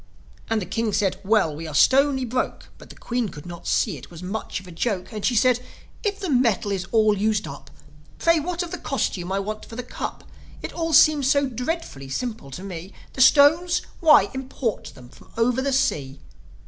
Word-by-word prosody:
And 225 -1 +1
the 195 - -4
King 225 0 -2
said, 195 -2 0
"Well, 195 -7 +2
we 160 +2 -6
are 155 - -6
stony 265 - +4
broke." 250 +2 -3
But - - -14
the - - -12
Queen 240 -3 -2
could 145 -3 -11
not 175 -1 -9
see 195 -10 +1
it - - -13
was 170 0 -11
much 200 +2 -4
of 190 - -15
a 180 - -11
joke. 190 +3 -3
And 210 -2 -5
she 245 - +1
said, 250 +2 +4 0.4
"If 410 -2 -1
the 385 -3 -4
metal 230 -6 +2
is 190 -1 -2
all 215 -2 +4
used 210 +1 0
up, 140 0 -10 0.5
Pray 335 -1 +3
what 350 +3 -2
of 345 - -8
the - - -5
costume 190 - -2
I 195 - 0
want 215 +2 -4
for 225 - -11
the 250 - -4
Cup? 245 - -6 0.4
It - - -5
all 330 -1 -2
seems 290 -2 +6
so 280 0 +3
dreadfully 250 - -4
simple 215 - -4
to 155 +8 -8
me. 185 0 -7 0.2
The 260 - -2
stones? 305 +6 +5 0.2
Why, 315 -3 +6
import 265 -3 -3
them 125 -2 -13
from - - -18
over 240 +2 +2
the 275 +1 0
sea." 140 - 0
225 Hz, 210 wpm, -23 LUFS, 185-270 Hz, 0.5 s, seems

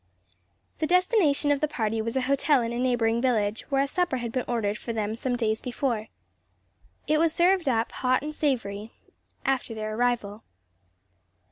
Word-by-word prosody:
The 310 - 0
destination 360 - +3
of 285 - +2
the 305 - +2
party 225 -6 -1
was 230 +3 -2
a - - +2
hotel 275 0 +2
in 230 +1 -3
a 240 - -3
neighboring 235 -2 +1
village, 220 -4 +1
where 275 -1 +2
a - - -2
supper 350 -2 0
had 240 -2 -4
been 255 +1 -2
ordered 215 -4 -1
for 235 - -5
them 215 -1 -2
some 245 +2 -2
days 220 -2 0
before. 240 -3 -2 1.0
It 305 +1 +2
was 330 0 +3
served 355 -3 +3
up, 230 -2 0
hot 255 +1 +1
and 305 +1 -4
savory, 225 -8 -2
shortly - - -34 0.5
after 265 -3 0
their 215 0 -4
arrival. 230 -3 -1
245 Hz, 175 wpm, -26 LUFS, 225-285 Hz, 1.0 s, destination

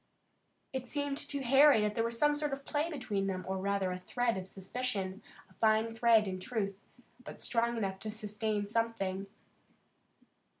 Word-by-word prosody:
It 260 -1 -3
seemed 285 +1 -2
to 280 -3 -4
Harry 270 -1 +7
that 210 0 +1
there 225 - +1
was 230 0 -2
some 295 +3 +4
sort 295 -1 -1
of 275 0 -6
play 300 +2 0
between 210 -10 -2
them, 185 -1 -3
or 190 0 -1
rather 195 -1 0
a 180 - -4
thread 240 +5 0
of 190 -1 -5
suspicion, 195 0 -3 0.3
a - - -22
fine 220 +1 +2
thread 225 -2 +5
in 185 -1 -3
truth, 200 -1 -3 0.4
but - - -9
strong 235 0 +1
enough 195 -3 -2
to 215 - -4
sustain 210 -1 -2
something. 200 -3 -1
220 Hz, 170 wpm, -33 LUFS, 195-250 Hz, 0.4 s, Harry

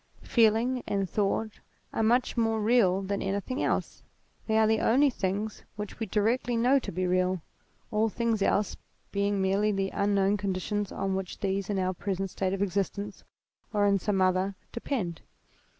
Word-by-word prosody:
Feeling 235 +2 +3
and 195 -1 0
thought 210 +2 -1 0.3
are - - 0
much 240 +3 +2
more 225 -2 +1
real 210 -4 +3
than 200 +1 -2
any 195 +1 0
thing 255 +6 -4
else; - - -1 0.5
they 220 -1 +2
are 220 - +5
the 220 0 +3
only 275 +4 +4
things 205 0 -2
which 210 -1 -6
we 225 - -2
directly 230 +4 +1
know 255 +4 +4
to - - -6
be 185 +2 -1
real, 185 -1 +1 0.5
all 215 +1 +2
things 230 -1 -1
else 200 +1 +1 0.4
being 200 0 0
merely 195 +2 +2
the 195 -1 -1
unknown 200 0 +2
conditions 200 +1 -2
on 195 0 -2
which 190 -1 -4
these, 195 0 -1
in 205 - 0
our 185 0 0
present 195 0 -3
state 190 -1 -1
of 195 +1 0
existence 200 +1 -3 0.5
or 205 -1 +3
in 200 -1 +3
some 195 0 +1
other, 185 +1 +1 0.2
depend. 220 - -3
200 Hz, 170 wpm, -28 LUFS, 195-220 Hz, 0.5 s, are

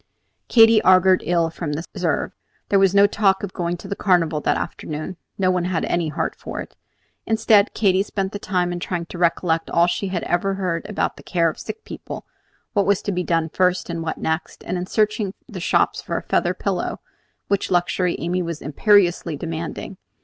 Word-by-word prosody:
Katy 225 -2 +6
augured 185 -1 +5
ill 170 -2 +2
from 165 -3 -4
this 160 +4 -4
reserve. - - -1 0.4
There 200 - +4
was 195 0 +3
no 200 0 +7
talk 200 -1 +2
of 200 - -4
going 175 0 -2
to - - -10
the 200 - -3
Carnival 165 -6 +2
that - - +1
afternoon; 155 +4 -5 0.2
no 185 -1 +2
one 180 -1 0
had 180 -2 -1
any 175 -2 0
heart 155 +3 -2
for - - -7
it. - - -8 0.5
Instead, 220 -2 +3
Katy 190 -3 +3
spent 195 -1 -2
the 205 - -5
time 180 -3 -1
in 175 - -4
trying 175 -1 -3
to 170 - -9
recollect 170 -1 +1
all 170 - +4
she 175 +3 -1
had 185 -2 -2
ever 195 +3 0
heard 180 -1 -2
about 210 - -1
the - - -11
care 170 -3 +1
of - - -14
sick 440 - -7
people, - - -8 0.5
what 200 -4 +2
was 200 -1 +2
to 205 - -1
be 180 -1 -1
done 165 -2 0
first 180 0 +1
and 165 -1 -3
what 160 -1 -3
next, 160 +1 -3
and - - -3
in 180 0 -3
searching 210 -1 0
the - - -7
shops - - +1
for - - -3
a - - -4
feather - - +1
pillow, - - -2 0.5
which 200 -1 0
luxury 175 0 +1
Amy 180 +2 -1
was 170 -2 -4
imperiously 175 0 +2
demanding. 165 +4 -5
180 Hz, 200 wpm, -22 LUFS, 170-195 Hz, 0.5 s, no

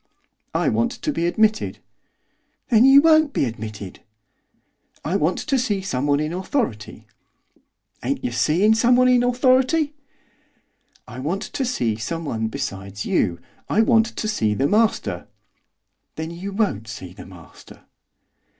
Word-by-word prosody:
'I - - +2
want 235 +1 +1
to 305 - -3
be 170 -6 0
admitted.' 215 +4 +1 0.9
'Then 230 +1 +6
you 270 +1 +8
won't 315 -3 +4
be - - +1
admitted!' 110 -5 -7 1.1
'I 170 - -1
want 160 +2 0
to 275 -3 0
see 210 -6 -1
someone 145 -4 0
in 155 +2 -2
authority.' 180 - -3 1.0
'Ain't - - -2
yer - - -2
seein' 155 - +3
someone 245 +3 +4
in 250 -1 +4
authority?' 255 +5 +2 1.1
'I 125 0 -9
want 175 +10 -2
to 275 - -4
see 120 - -1
someone 115 -2 -3
besides 100 -5 -5
you, 85 -4 0 0.3
I 220 - +3
want 225 0 +4
to 215 - -2
see 110 - 0
the 135 +6 +1
master.' 220 +4 0 0.9
'Then 160 +1 -5
you 180 +4 -6
won't 195 - -1
see 95 -4 -8
the 100 - -12
master! 90 -4 -15
180 Hz, 135 wpm, -22 LUFS, -, 1.1 s, you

